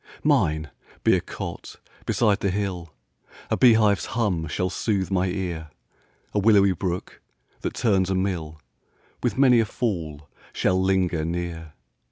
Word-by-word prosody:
Mine 80 0 +2 0.3
be - - +5
a - - 0
cot - - -7 0.3
beside 105 -4 +2
the 100 - 0
hill, 90 -4 -3 0.6
A - - +3
bee 125 -2 +6
hive's 105 -5 +2
hum 90 -9 0
shall 90 +4 -2
sooth 100 -4 -1
my 95 -1 +1
ear; 90 -4 -4 0.6
A 105 - +2
willowy 100 -2 +5
brook, 90 0 -4 0.4
that - - -4
turns 95 -5 +2
a 95 - +1
mill, 85 -5 -2 0.6
With - - -1
many 130 -3 +6
a 115 - +3
fall 80 - -3 0.3
shall 95 0 +1
linger 95 -4 +1
near. 85 -1 -4
95 Hz, 145 wpm, -24 LUFS, 85-100 Hz, 0.6 s, bee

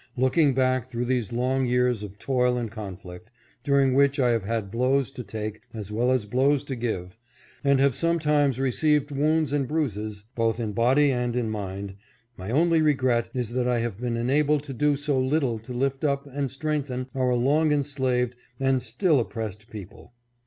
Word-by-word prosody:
Looking 130 +2 +3
back 130 -2 +1
through 120 -1 -3
these 120 -4 -1
long 130 +2 0
years 125 -2 +1
of 100 -1 -8
toil 125 +1 +1
and 115 -3 -3
conflict, 100 -2 -9 0.3
during 140 -2 +3
which 140 +1 +3
I 125 -2 +3
have 115 -4 0
had 110 -2 -2
blows 130 +3 +1
to 125 -2 -7
take 110 0 -6
as 105 -2 -6
well 120 +4 +1
as 130 -4 +1
blows 135 +5 +2
to 140 -2 -5
give, 110 -6 -4 0.5
and 140 -1 +3
have 140 -1 +4
sometimes 150 -4 +1
received 145 +2 +1
wounds 150 +1 +1
and 140 -3 0
bruises, 110 -9 -3
both 115 0 0
in 110 -3 -3
body 130 +6 +3
and 125 -2 -1
in 120 -3 -1
mind, 100 -1 -5 0.4
my 95 0 -7
only 165 +5 +3
regret 130 -6 +2
is 120 -3 -2
that 125 0 0
I 125 -1 +2
have 115 -4 -4
been 120 -2 -1
enabled 145 +4 +2
to 140 -2 -7
do 145 +3 +2
so 145 -1 0
little 130 -3 0
to 115 +3 -12
lift 135 +3 -1
up 140 -1 0
and 140 -1 -3
strengthen 135 -2 -3
our 130 -2 +1
long 150 +6 +2
enslaved 130 -4 0 0.2
and 135 -1 +2
still 140 - +1
oppressed 110 -2 -5
people. 105 +2 -11
125 Hz, 180 wpm, -25 LUFS, 115-140 Hz, 0.5 s, have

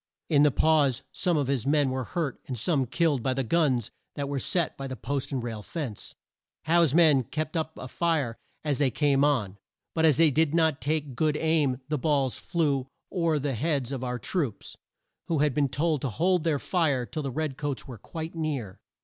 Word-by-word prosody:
In 145 -3 +4
the 150 - +6
pause 145 -3 +2
some 175 -3 +1
of 145 - +1
his 135 -2 -1
men 145 -2 +3
were 130 0 -2
hurt 160 -4 -3
and 130 - -4
some 135 - +1
killed 150 -1 +1
by 130 +2 0
the 135 - 0
guns 130 -4 +1 0.2
that 140 -1 -3
were 140 -1 -2
set 170 +5 -1
by 135 - -5
the 130 - -5
post 140 +2 -3
and 130 -3 -2
rail 115 -3 -4
fence. 130 - -6 0.5
Howe's 165 -2 +3
men 155 -6 +6
kept 155 +7 -4
up 160 -1 -2
a 130 - -7
fire 150 -5 0 0.3
as 145 -3 0
they 140 -3 +3
came 140 +2 +2
on, 105 -9 +1 0.3
but 160 - 0
as 155 -4 +5
they 165 -2 +5
did 160 +2 +2
not 160 -5 +2
take 145 -1 -1
good 150 +2 +1
aim 150 -5 +1
the 150 -1 -1
balls 140 -3 +1
flew 145 -6 -1 0.2
o'er 170 -4 +1
the 140 -1 -1
heads 140 0 -1
of 130 -2 -4
our 125 -1 -2
troops, 135 - -3 0.5
who 165 - 0
had 145 -1 +2
been 140 0 +1
told 150 +2 0
to 135 - -1
hold 175 - +1
their 160 -3 +2
fire 145 -6 0
till 155 - -5
the 140 - -3
red 150 +1 -2
coats 145 -1 -4
were 120 -5 -9
quite 160 +7 -6
near. 145 - -3
145 Hz, 210 wpm, -27 LUFS, 130-160 Hz, 0.5 s, the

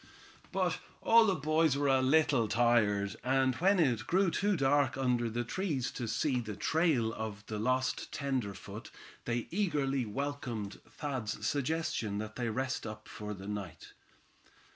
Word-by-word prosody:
But - - 0 0.2
all 230 -1 +6
the 195 - +3
boys 155 -1 +2
were 145 0 +1
a 135 -1 +4
little 135 -3 +3
tired, 105 -3 +2
and 130 +1 +2
when 190 +4 +3
it 120 -7 +2
grew 185 0 +3
too 200 +3 +1
dark 135 -2 +2
under 125 -3 +1
the 120 +2 -2
trees 145 - -2
to 120 - -4
see 130 +3 +1
the 110 -3 -5
trail 135 - +1
of 110 -2 -6
the 110 -1 -4
lost 130 +3 0
tenderfoot 130 -8 -4 0.4
they 120 -1 -1
eagerly 145 - 0
welcomed 120 -4 -4
Thad's 115 -8 -4
suggestion 140 -7 -1
that 110 +1 -5
they 120 -2 -1
rest 130 +1 -2
up 110 0 -8
for 105 0 -6
the 95 +1 -9
night. 105 -1 -6
130 Hz, 150 wpm, -32 LUFS, 110-145 Hz, 0.4 s, all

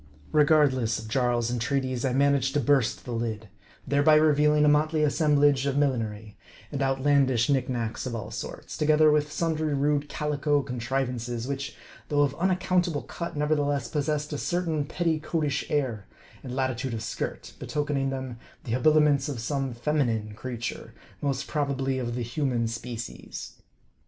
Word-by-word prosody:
Regardless 145 -7 +3
of 110 -1 -7
Jarl's 120 0 +1
entreaties, 130 +1 -1
I 130 - +1
managed 140 0 +2
to - - +4
burst 135 -3 +1
the 125 - -6
lid; 115 -2 -3 0.4
thereby 145 +2 +4
revealing 150 -1 +4
a - - +5
motley 155 +1 +3
assemblage 145 -2 +3
of 140 0 0
millinery, 110 -7 -1 0.3
and 140 - -3
outlandish 135 -2 +2
knick 135 -3 +1
knacks 120 0 -3
of 120 - -4
all 110 - -6
sorts; - - -7
together 155 0 +5
with 150 0 +1
sundry 155 -3 0
rude 145 +1 +1
calico 145 -1 0
contrivances, 125 -1 -3
which 140 0 -4 0.3
though 145 -1 +3
of 140 -2 +1
unac 185 +1 +2
countable 175 -5 +1
cut, 170 -3 -6
nevertheless 145 -1 0
possessed 150 0 -1
a 145 - -3
certain 165 -4 -1
petticoatish 155 -3 -1
air, 125 -9 -1 0.3
and 125 -1 -6
latitude 130 -2 -1
of 110 - -5
skirt, - - -5
betokening 145 -2 -1
them 130 -3 -5 0.2
the 115 - -6
habiliments 150 +2 +3
of 135 -5 -4
some 135 +2 -2
feminine 120 -5 -1
creature; 120 +1 -6 0.3
most 140 -2 -1
probably 135 -3 -1
of 120 -2 -3
the 120 - -2
human 120 -1 -1
species. 115 0 -7
140 Hz, 150 wpm, -27 LUFS, 125-150 Hz, 0.4 s, a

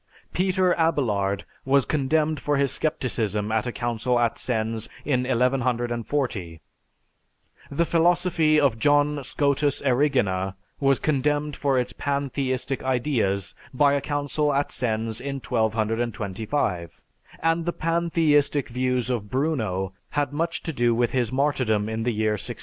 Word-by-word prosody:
Peter 185 0 +2
Abelard 105 -12 +1 0.2
was 135 0 +3
condemned 155 +1 +1
for 145 +1 0
his 140 -1 +2
scepticism 110 -8 -1
at 110 +2 0
a - - -1
council 120 +1 -1
at 120 -1 0
Sens 110 -2 -1 0.2
in 125 -3 +1
1140; 120 - -1 1.1
the 155 +4 +1
philosophy 165 -2 +3
of 135 -6 +2
John 145 +1 +2
Scotus 140 +1 +1
Erigena 120 -9 +1 0.2
was 135 -2 +3
condemned 150 0 0
for 140 -2 +1
its 125 - -1
pantheistic 135 -2 -2
ideas 120 -7 0 0.2
by 140 +1 +4
a 140 - +1
council 145 0 -1
at 140 +1 0
Sens 110 -2 -1
in 140 +1 -4
1225; 110 - -1 0.4
and 165 0 +1
the - - +2
pantheistic 160 -5 +1
views 125 0 0
of 105 -4 -3
Bruno 110 - -1 0.2
had 145 -1 -1
much 165 +3 -2
to 165 - -4
do 120 -2 +2
with 120 0 +1
his 125 -4 0
martyrdom 130 -6 +1
in 110 0 -3
the 120 +2 0
year 110 -1 0
1600. 105 -3 -4
130 Hz, 135 wpm, -25 LUFS, 115-145 Hz, 1.1 s, by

